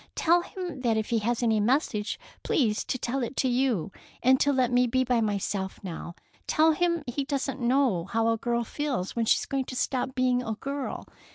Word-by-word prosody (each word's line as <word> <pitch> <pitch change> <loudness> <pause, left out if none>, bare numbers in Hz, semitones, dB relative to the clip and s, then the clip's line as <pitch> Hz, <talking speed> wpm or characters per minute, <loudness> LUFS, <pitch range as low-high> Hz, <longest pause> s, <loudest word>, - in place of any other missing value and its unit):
Tell 345 +1 +4
him 355 -5 -6
that 230 -3 +2
if 220 +1 -2
he 230 - +3
has 235 +3 -1
any 220 -2 +3
message, 215 -2 0 0.2
please 220 -7 +1
to - - -2
tell 255 +2 -2
it 240 +2 -4
to 265 - +2
you, 245 -8 +1 0.3
and 260 +2 +5
to 285 - +3
let 255 -3 +2
me 245 0 +4
be 260 +2 +2
by 245 -2 +1
myself 200 -2 -2
now. 170 -1 -6 0.3
Tell 320 +1 +4
him 340 0 +1
he 255 +3 -2
doesn't 275 -1 -3
know 240 -8 +2
how 225 +3 +1
a 225 - +2
girl 235 0 0
feels 255 -7 -3
when 230 -1 +1
she - - +4
is - - -3
going 270 -1 -2
to 255 - -7
stop 260 +1 -1
being 255 -1 +2
a 225 -3 -3
girl. 275 +3 -4
250 Hz, 210 wpm, -27 LUFS, 225-275 Hz, 0.3 s, and